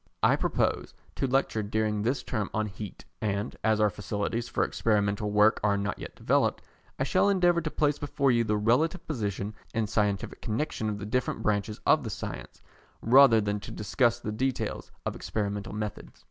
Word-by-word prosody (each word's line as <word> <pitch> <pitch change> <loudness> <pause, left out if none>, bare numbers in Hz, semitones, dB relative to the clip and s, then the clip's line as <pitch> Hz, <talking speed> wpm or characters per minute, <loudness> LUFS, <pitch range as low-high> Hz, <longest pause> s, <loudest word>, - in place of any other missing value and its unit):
I - - +6
propose - - -1 0.2
to 135 - -1
lecture 130 -4 +1
during 105 0 -1
this 125 +6 0
term 110 -5 -2
on 110 0 +1
Heat, 100 -1 -8 0.2
and, 105 0 -2
as 110 -1 +3
our 105 -1 +3
facilities 105 +3 -3
for - - +1
experimental 105 -1 0
work 105 +1 +4
are 105 -1 +3
not 100 +1 -2
yet - - -7
fully - - -17
developed, - - +2 0.3
I - - 0
shall 200 - +3
endeavour 175 -3 +3
to 155 - -2
place 150 -1 +1
before 140 -2 +1
you 120 -1 +3
the 105 -1 0
relative 150 - +1
position 105 - -3 0.2
and 115 -2 +1
scientific 105 -1 -1
connexion 110 -1 -2
of 105 - -3
the 105 - -6
different 125 +4 -1
branches 105 0 0
of - - +4
the - - -4
science, - - -7 0.4
rather 125 -1 +7
than 105 0 -1
to - - -9
discuss 120 +3 +1
the 110 - -4
details 130 +4 -2 0.2
of - - -2
experimental 105 -1 -3
methods. 105 -1 -6
110 Hz, 185 wpm, -28 LUFS, 105-125 Hz, 0.4 s, rather